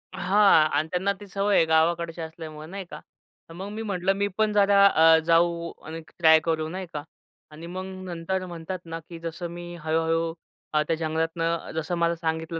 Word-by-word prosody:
हां, 195 -4 +5
आणि 155 +2 0
त्यांना 190 +2 0
ती 205 - -11
सवय 200 +1 0
आहे 165 - +5
गावाकडची 165 +1 +1
असल्यामुळं 160 -1 -8
नाही 195 -1 -6
का, - - -7 0.5
तर - - -10
मग 190 +4 -7
मी 215 +1 -5
म्हटलं 195 -3 0
मी 200 +1 0
पण 215 -1 +2
जरा 200 -1 +5
अ, 160 -3 +6
जाऊ 170 0 +2
आणि 160 +1 -6 0.2
ट्राय 160 -1 +7
करू 160 -1 -1
नाही 185 +3 -5
का 150 -1 -4 0.5
आणि 160 +2 -10
मग 185 +2 -5 0.2
नंतर 185 +2 -3
म्हणतात 175 +1 -6
ना, 165 0 -5
की 165 +1 -11
जसं 165 +1 -5
मी 175 0 -8
हळू-हळू 165 +1 0 0.4
अ, 150 - +3
त्या 165 - +1
जंगलातनं 165 +1 -2
जसं 160 +2 -2
मला 170 0 +1
सांगितलं, 160 0 -3
170 Hz, 185 wpm, -26 LUFS, 160-185 Hz, 0.5 s, ट्राय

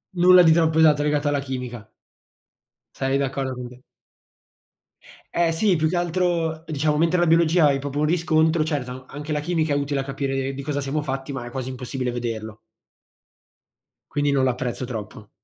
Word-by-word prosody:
nulla 180 +1 +7
di 165 - +6
troppo 160 -1 +3
esatto, 150 -2 +5
legato 150 0 0
alla 145 -1 +1
chimica. 125 -5 -6 1.1
Sarei 135 0 0
d'accordo 135 -1 -2
con 125 -1 -7
te. 125 +1 -16 1.5
Eh 170 -1 +3
sì, 185 +4 +2
più 155 -1 +1
che 175 - -1
altro, 170 -2 0
diciamo, 150 -1 0
mentre 165 +3 +2
la 175 - +3
biologia 165 0 +4
hai 140 -1 +2
proprio 145 +1 -4
un 150 - +2
riscontro, 160 0 +2
certo, 130 -5 -3
anche 150 +2 -6
la 150 - 0
chimica 160 -1 0
è - - +1
utile 140 0 -1
a 135 - -2
capire 135 0 -3
di 140 - -6
cosa 145 0 -2
siamo 140 +2 -2
fatti, 135 0 -4
ma 130 -3 -5
è 120 - -8
quasi 130 0 -5
impossibile 125 0 -4
vederlo. 110 -3 -5 1.5
Quindi 145 0 +1
non 135 -1 +2
l'apprezzo 125 0 -2
troppo. 110 -3 -7
145 Hz, 175 wpm, -23 LUFS, 130-160 Hz, 1.5 s, nulla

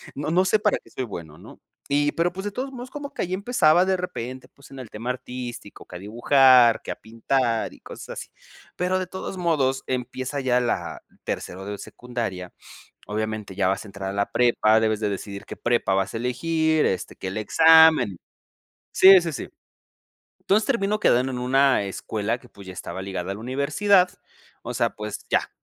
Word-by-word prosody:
No 145 +2 -3
no 185 +2 +3
sé 215 +2 +3
para 210 -1 +2
qué - - -19
soy 130 - -4
bueno, 80 -8 -9
¿no? - - -14 0.3
Y, 145 +1 +2
pero 170 +1 +1
pues 190 +1 -6
de 205 - -2
todos 265 +5 -4
modos, 255 -1 -8
como 285 0 -7
que - - -4
allí 180 - -4
empezaba 185 -5 +3
de 190 0 +2
repente, 130 -8 -6
pues 140 - -18
en 135 - -10
el 125 - -9
tema 115 +4 -6
artístico, 125 -4 -7
que 90 - -12
a - - -6
dibujar, 120 +3 +5
que - - -5
a - - -4
pintar 115 +1 -1
y - - -17
cosas - - -11
así. - - -8 0.5
Pero 180 +1 0
de 185 - -4
todos 190 +1 -6
modos, 140 -7 0
empieza 130 +2 -3
ya 125 -1 +2
la 120 - -2 0.2
tercero 95 +2 -5
de 100 0 -5
secundaria. 115 -8 -6 0.5
Obviamente, 110 -1 -4
ya 95 -1 +1
vas 95 - -1
a - - -10
entrar 95 -1 -6
a - - -4
la 100 0 -1
prepa. 110 -2 +3
Debes 110 -1 0
de 105 - 0
decidir 100 0 -6
qué - - -8
prepa 120 -5 +1
vas 95 0 0
a - - -3
elegir, 155 +6 +1
este, 95 - -3
que - - -6
el 95 +3 -4
examen. 160 - +5 0.8
Sí, 190 -1 +8
sí, 165 -1 -3
sí. - - -6 0.9
Entonces, 210 +2 +2
termino 210 -5 0
quedando 130 -7 +3
en 125 - -4
una 130 -1 +3
escuela 105 +3 -3
que 125 - -19
pues, 100 -3 -14
ya 95 - -7
estaba 95 - -6
ligada 95 -1 -4
a - - -4
la - - -10
universidad. 155 - +2 0.5
O - - -6
sea, - - +2
pues 105 -1 -7
ya, - - +1
125 Hz, 200 wpm, -24 LUFS, 105-165 Hz, 0.9 s, Sí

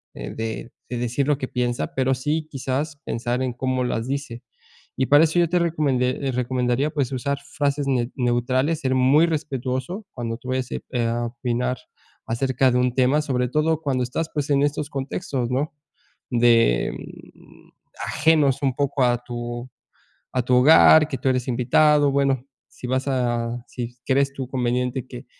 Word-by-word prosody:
eh, - - -6
de 115 +1 -5 0.3
decir 120 +3 -1
lo 150 -2 +2
que 130 - -4
piensa, 120 -1 -2
pero 130 0 +2
sí 150 +4 -2
quizás, 140 +3 -3
pensar 120 +2 -2
en 130 -2 -1
cómo 130 +1 -1
las 115 0 -2
dice, 135 -3 -4 0.5
y 130 - +2
para 145 +2 +6
eso, 165 +2 +2
yo 170 - +4
te 180 0 +2
recomende 135 -5 0
recomendaría 125 +2 0
pues 140 -4 -1
usar 140 +2 -1 0.2
frases 140 0 0
ne 125 -2 0
neutrales, 130 +5 0
ser 130 -1 0
muy 135 +5 +5
respetuoso 145 - -3
cuando 115 -2 -4
tú 130 +1 -10
vayas, 130 -1 -2
eh, - - -3 0.2
a 120 +1 -1
opinar 125 +1 -2 0.5
acerca 130 +2 +1
de 125 - +2
un 125 -1 +1
tema, 135 +4 +3
sobre 125 -4 -1
todo 155 +2 +1
cuando 130 -4 0
estás, 155 +6 -3
pues, 150 -1 -2
en 140 0 +3
estos 145 0 -1
contextos, 135 -2 -3
¿no?, 140 +4 -1 0.6
de, 115 - +3
mm, - - -14 0.4
ajenos 150 -3 +3
un 135 -2 +2
poco 140 -1 0
a 120 0 +2
tu 120 +1 -6 0.6
a 125 - +1
tu 125 +1 +1
hogar, 155 +3 +7
que 135 - -4
tú - - 0
eres 125 -1 0
invitado, 145 +4 +3
bueno, 135 -2 +1 0.3
si 125 - -9
vas 130 +2 0
a 120 -2 -1
si 120 0 -6
crees 140 +1 +2
tú 130 -2 -5
conveniente 125 0 -1
que 125 +1 -9
130 Hz, 170 wpm, -23 LUFS, 125-145 Hz, 0.6 s, hogar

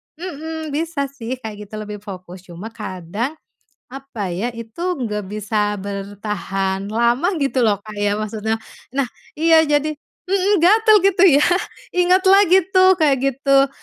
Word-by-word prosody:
mhm, 320 -2 -6
bisa 295 -2 -2
sih 255 -2 -5
kayak 210 -2 -8
gitu 215 - -10
lebih 210 -1 -6
fokus 185 -3 -10
cuma 180 +6 -9
kadang, 210 - -5 0.6
apa 260 -9 -6
ya, 195 +8 -2
itu 230 +6 -9 0.2
nggak 210 -6 -3
bisa 210 0 -1
bertahan 200 -1 -4
lama 235 +8 +1
gitu 275 -3 0
loh 215 -4 +3
Kak 215 -1 -9
ya 205 0 +1
maksudnya. 215 +1 -2 0.4
Nah 275 - +2 0.3
iya, 325 +1 +5
jadi 295 +1 +1 0.3
mhm, 390 +2 +2
gatel 435 +3 +6 0.2
gitu 360 - +1
ya, 290 -2 +5 0.5
ingat 360 +1 +3
lagi 380 -1 +5
tuh, 375 0 +6
kayak 305 -5 +3
gitu, 275 +1 +2
240 Hz, 145 wpm, -20 LUFS, 210-320 Hz, 0.6 s, gatel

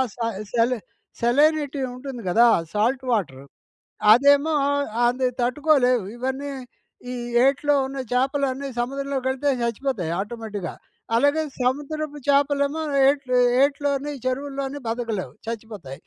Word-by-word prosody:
స - - -35 0.4
సెలి 240 +1 +2 0.4
సెలైనిటీ 290 +3 +2
ఉంటుంది 250 -1 -7
గదా! 230 +7 +5 0.3
Salt 240 +5 +1
water. 140 - -2 0.7
అదేమో 285 +5 +4 0.5
అది 255 +2 +2
తట్టుకోలేవు. 255 -2 +2
ఇవన్నీ 265 +3 -3 0.6
ఈ - - -4 0.3
ఏట్లో 285 +2 +2
ఉన్న 270 0 -6
చేపలన్నీ 270 +1 0
సముద్రంలోకెళితే 270 +1 -1
చచ్చిపోతాయి 235 -7 -2
ఆటోమేటిక్‌గా. 210 -3 -5 0.4
అలాగే 285 +5 +3 0.2
సముద్రపు 295 +3 -2
చేపలేమో, 285 +2 +2 0.3
ఏట్లు 275 -3 +1 0.3
ఏట్లోని 285 0 0
చెరువుల్లోని 275 +1 -3
బతకలేవు 225 - -3
చచ్చిపోతాయి. 210 - -7
265 Hz, 95 wpm, -23 LUFS, 235-285 Hz, 0.7 s, గదా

